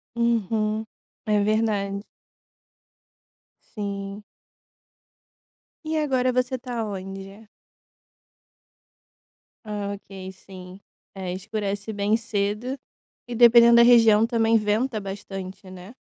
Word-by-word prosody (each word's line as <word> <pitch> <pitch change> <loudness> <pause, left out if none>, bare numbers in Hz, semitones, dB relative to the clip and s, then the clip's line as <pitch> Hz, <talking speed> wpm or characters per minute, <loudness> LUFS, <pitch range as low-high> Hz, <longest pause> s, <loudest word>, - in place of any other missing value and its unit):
Uhum, 220 -2 0 0.4
é 210 -2 +2
verdade. 210 -2 0 1.8
Sim. 200 -1 -5 1.6
E 315 0 -2
agora 260 -4 +1
você 255 +1 0
está 245 -2 -4
onde? 195 +1 -8 2.2
Ah, 205 -1 -4
ok 190 -1 -9
sim, 185 0 -12 0.3
é 185 -2 -5
escurece 205 +1 -4
bem 205 +1 +1
cedo, 225 +3 -2 0.5
e 240 - -5
dependendo 235 0 +7
da - - +8
região 225 -3 +6
também 230 -1 +2
venta 215 +3 0
bastante, 195 -1 -8
né. 185 +4 -11
210 Hz, 90 wpm, -24 LUFS, 195-235 Hz, 2.2 s, da